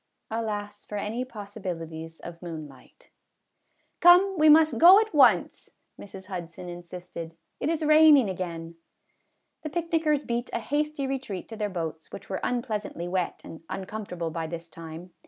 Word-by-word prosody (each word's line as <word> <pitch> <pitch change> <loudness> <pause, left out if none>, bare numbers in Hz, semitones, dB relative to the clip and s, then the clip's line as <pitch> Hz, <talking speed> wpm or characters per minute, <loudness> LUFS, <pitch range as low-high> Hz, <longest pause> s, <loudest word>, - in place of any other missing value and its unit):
Alas 210 -2 -4
for 210 - -8
any 215 +5 -2
possibilities 165 -8 -7
of 170 -1 -9
moonlight! 155 -6 -10 0.4
" - - -45
Come, 365 +3 +7
we 310 -2 +5
must 310 +1 +6
go 360 +5 +9
at 440 -3 -1
once," 245 - +4 0.3
Mrs. 190 -1 -10
Hudson 180 -2 -7
in 175 0 -7
sisted; 170 -2 -9
" - - -51
it - - -1
is 320 -1 -1
raining 305 -5 +7
again." 170 -3 -5 0.8
The 310 - -5
picnickers 320 -3 0
beat 240 +1 -3
a - - 0
hasty 295 +3 -1
retreat 260 -9 -4
to 225 - -7
their 210 -1 -2
boats, 160 -4 -5
which 195 - -9
were 190 - -2
unpleasantly 215 -8 -3
wet 180 -1 -2
and 160 - -10
uncomfortable 185 -4 -5
by 165 0 -3
this 170 0 -7
time. 165 +2 -10
205 Hz, 155 wpm, -27 LUFS, 170-280 Hz, 0.8 s, go